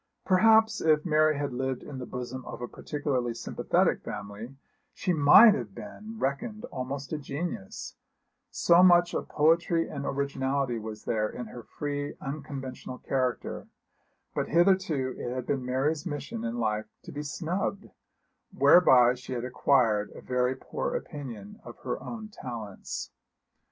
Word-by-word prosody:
Perhaps 220 +3 +5
if 155 0 +3
Mary 155 -2 +3
had 145 -2 -2
lived 130 0 -2
in 135 -3 -7
the 125 - -6
bosom 125 0 -6
of - - -7
a 120 - -4
particularly 130 -6 -2
sympathetic - - +1
family 105 +5 -7 0.4
she 180 - 0
might 170 +9 +8
have 110 - -5
been 205 - -9
reckoned 215 - -2
almost 135 +2 -5
a 155 - -1
genius, 140 - -5 0.5
so 170 +1 +4
much 175 -1 +6
of - - -3
poetry 165 +2 +3
and 140 -2 -5
originality 135 -3 -1
was 110 -1 -7
there 110 -1 0
in 125 - -6
her 120 +2 -9
free 145 +3 -4
unconventional 135 -3 -6
character; 130 -4 -2 0.7
but - - -1
hitherto 170 -6 +2
it 120 +1 -4
had 130 -1 -3
been 135 -1 -1
Mary's 135 +5 0
mission 145 -8 -5
in 115 +1 -3
life 110 -2 -1 0.2
to - - -9
be 145 - -5
snubbed, 180 +7 -3 0.6
whereby 125 -8 +6
she 125 0 -7
had 120 0 -3
acquired 120 -5 +2
a - - -9
very 125 0 0
poor - - -4
opinion 130 - -7
of - - -10
her - - -3
own 220 -2 -6
talents. 115 - -7
135 Hz, 145 wpm, -28 LUFS, 125-160 Hz, 0.7 s, might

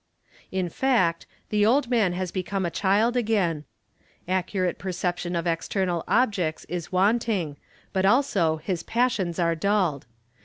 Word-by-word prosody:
In 185 -1 -1
fact, 205 -6 +1 0.2
the 210 -1 +2
old 250 +3 +3
man 215 -7 +3
has 180 -1 -3
become 190 0 -2
a 170 - -2
child 210 +7 +2
again; 200 -10 0 0.6
accurate 185 0 -1
perception 180 -1 -2
of 170 0 -1
external 175 +1 -1
objects 200 -10 +1
is 175 0 -5
wanting 195 -4 +1 0.4
but 190 - +1
also 195 - +3
his 170 +2 -3
passions 220 -8 0
are 170 -2 +2
dulled. 170 - 0
185 Hz, 130 wpm, -25 LUFS, 170-210 Hz, 0.6 s, old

